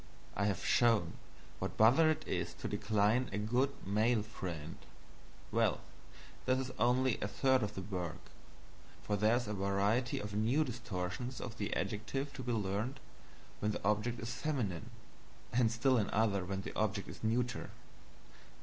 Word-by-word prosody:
I 100 - +1
have 95 -4 -1
shown 115 -8 +4 0.5
what - - -2
a - - -18
bother 130 +9 +6
it 155 0 -1
is 85 -1 -2
to - - -5
decline 110 +4 +2
a 100 - -2
good 120 +6 +2 0.2
(male) 110 +3 +2
friend; 85 -8 -6 0.7
well - - +2 0.7
this 130 - +4
is 130 -1 -3
only 125 +1 +3
a - - 0
third 130 +4 +3
of 105 -1 -2
the 95 - -4
work, 90 -4 -4 0.9
for 105 - 0
there 105 +3 +4
is 120 -2 -1
a 105 - -2
variety 100 +5 +1
of 105 0 -4
new 115 +9 +2
distortions 120 -1 -4
of 115 -3 -7
the 105 0 -2
adjective 135 +7 -2
to - - -6
be 125 -1 -2
learned 110 +4 -1 0.6
when 105 0 0
the - - -5
object 105 +3 +1
is 115 +2 -4
feminine, 125 - -2 0.6
and 120 -2 +4
still 125 +3 +3
another 100 -2 +1
when 95 +1 -3
the - - -7
object 105 -2 0
is - - -10
neuter. 120 +3 0
110 Hz, 160 wpm, -35 LUFS, 100-125 Hz, 0.9 s, bother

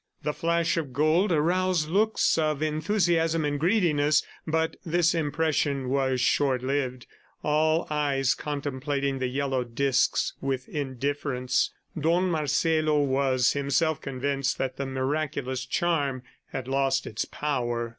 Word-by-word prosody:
The 150 +1 -1
flash 170 +1 0
of 145 -6 -3
gold 155 +8 +2
aroused 175 +1 +1
looks 210 +6 +2
of 155 -2 0
enthusiasm 165 0 +1
and 145 -1 -1
greediness, 155 -5 +2 0.2
but 160 +1 0
this 170 0 +2
impression 150 -4 0
was 130 -1 +1
short 130 0 +2
lived, 130 -2 -2 0.4
all 155 +2 +2
eyes 140 -3 +1
contemplating 140 -1 -3
the 130 - 0
yellow 135 0 -1
discs 130 +3 +1
with 135 -1 -2
indifference. 135 -2 -1 0.2
Don 170 +4 +1
Marcelo 155 0 +1
was 130 -2 +2
himself 145 +3 0
convinced 135 0 -2
that 130 -1 -3
the 140 - -3
miraculous 130 -1 -2
charm 140 -5 0 0.3
had 130 -1 -5
lost 135 0 +1
its 110 - -3
power. 120 -5 -2
145 Hz, 125 wpm, -26 LUFS, 135-160 Hz, 0.4 s, gold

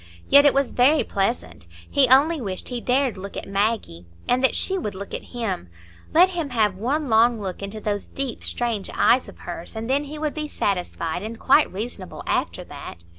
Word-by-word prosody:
Yet 285 +1 +8
it - - +4
was 275 -1 +1
very 280 +5 +4
pleasant; 85 - -2 0.2
he 275 -2 +4
only 285 +5 +5
wished 190 -5 -4
he 245 -2 -4
dared 255 -4 +1
look 200 +1 -7
at - - -6
Maggie, 195 - -1 0.2
and 250 +1 +2
that 265 - +3
she 385 - 0
would 210 - -3
look 200 +1 -8
at - - -5
him,—let 180 - -1
him 335 -5 -3
have 220 -5 +2
one 270 +10 -1
long 230 0 +4
look 190 -2 -5
into 200 +2 -5
those 205 -1 -3
deep, 270 -3 -5
strange 230 -5 -1
eyes 255 - +3
of - - -14
hers, 175 +3 -7
and 220 +1 -4
then 280 +3 +1
he 300 +2 -7
would 300 -1 -2
be 305 -1 -4
satisfied 180 - -2
and 220 +2 -6
quite 285 +3 +4
reasonable 200 -1 -6
after - - -1
that. 85 - -10
230 Hz, 195 wpm, -23 LUFS, 195-275 Hz, 0.2 s, Yet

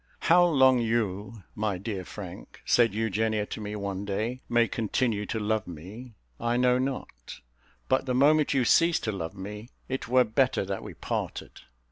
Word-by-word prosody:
"How 175 +1 +5
long 130 -7 +5
you, 110 -2 -2
my 105 -3 -1
dear 100 -1 -4
Frank," 90 +1 -10
said 115 -4 +3
Eugenia 110 0 0
to 110 - -7
me 105 0 -5
one 100 -1 -4
day, 110 +6 -3
"may 120 -1 +3
continue 110 -1 -1
to - - -2
love 110 0 -1
me, 100 +9 -10 0.2
I 120 +1 0
know 125 0 +3
not; 130 - -5 0.5
but 130 +1 +1
the 125 - 0
moment 150 +3 +4
you 130 -2 +2
cease 165 +6 +4
to 110 - -1
love 85 -3 -5
me, 105 +4 -8 0.2
it 130 -2 -4
were 125 +1 +5
better 125 -1 +1
that 95 0 -4
we - - -9
parted." - - -4
110 Hz, 170 wpm, -27 LUFS, 100-125 Hz, 0.5 s, How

